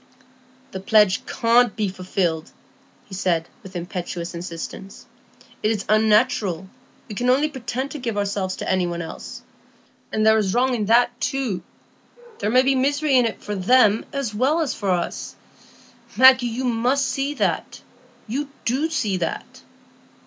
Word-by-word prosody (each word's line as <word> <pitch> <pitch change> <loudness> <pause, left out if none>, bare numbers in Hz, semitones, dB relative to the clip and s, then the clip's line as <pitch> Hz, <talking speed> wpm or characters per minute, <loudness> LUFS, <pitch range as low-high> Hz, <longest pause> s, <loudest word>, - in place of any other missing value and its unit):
"The 190 - -5
pledge 205 -1 +3
can't 235 -1 +3
be 215 -2 0
fulfilled," 180 -3 -2 0.6
he 195 - -14
said, 175 -3 0
with 190 -4 -13
impetuous 175 0 -5
insistence. 170 +3 -8 0.6
"It 215 - +1
is 215 -3 -1
unnatural; 215 - +2 0.4
we 220 - -7
can 245 +4 -1
only 275 +4 +3
pretend 260 0 -4
to 300 - -6
give 230 -4 -3
ourselves 200 -2 -1
to - - -6
any 185 -1 +1
one 170 0 -4
else. 165 - -9 0.7
There 220 0 +3
is 195 -1 -1
wrong 255 +1 +2
in 220 -4 -1
that 240 +1 +3
too; 250 -5 -1 0.8
there 210 - -1
may 255 +3 +5
be 270 +1 +3
misery 285 +2 +1
in 250 -2 +5
it 220 - -7
for 210 - -4
them 210 +2 +4
as 275 -6 -3
well 265 +9 +1
as 305 - -1
for 200 -3 -3
us. 175 -2 -2 0.8
Maggie, 260 -1 +7
you 240 +3 -3
must 250 +3 +1
see 275 +2 -2
that; - - -2 0.4
you 275 +6 -3 0.2
do 270 +7 0
see 215 -12 -1
that." 165 -2 -5
220 Hz, 155 wpm, -22 LUFS, 190-255 Hz, 0.8 s, Maggie